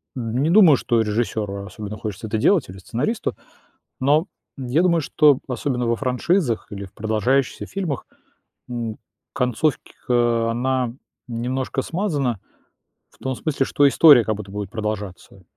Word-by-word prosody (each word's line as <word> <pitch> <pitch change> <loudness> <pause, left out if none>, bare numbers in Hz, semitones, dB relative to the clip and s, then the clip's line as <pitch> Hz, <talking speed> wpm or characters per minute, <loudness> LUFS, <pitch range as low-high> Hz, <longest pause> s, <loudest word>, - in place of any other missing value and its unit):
не 125 +4 -1
думаю, 175 -6 +7
что 120 -1 +1
режиссёру 105 -2 -2
особенно 105 +1 -7
хочется 110 +1 -6
это 110 +1 -1
делать 165 - +3
или 95 - -9
сценаристу, 135 - -2 0.7
но 150 +6 +3 0.3
я 135 +5 +1
думаю, 170 -2 +3
что 145 -1 +4
особенно 125 -1 -2
во 115 0 +1
франшизах 130 - 0
или 100 -1 -6
в 95 - -13
продолжающихся 110 +5 0
фильмах, 180 -9 -4 0.6
м, 115 -3 -4 0.4
концовка, 120 -2 0
она 125 0 0 0.4
немножко 125 +3 -2
смазана 145 - -1 0.7
в - - -26
том 130 0 -2
смысле, 140 0 -1
что 145 +1 +3
история 140 -3 +7
как 110 - 0
будто 100 -2 -9
будет 100 -2 -5
продолжаться. 105 -3 -5
120 Hz, 135 wpm, -22 LUFS, 110-140 Hz, 0.7 s, думаю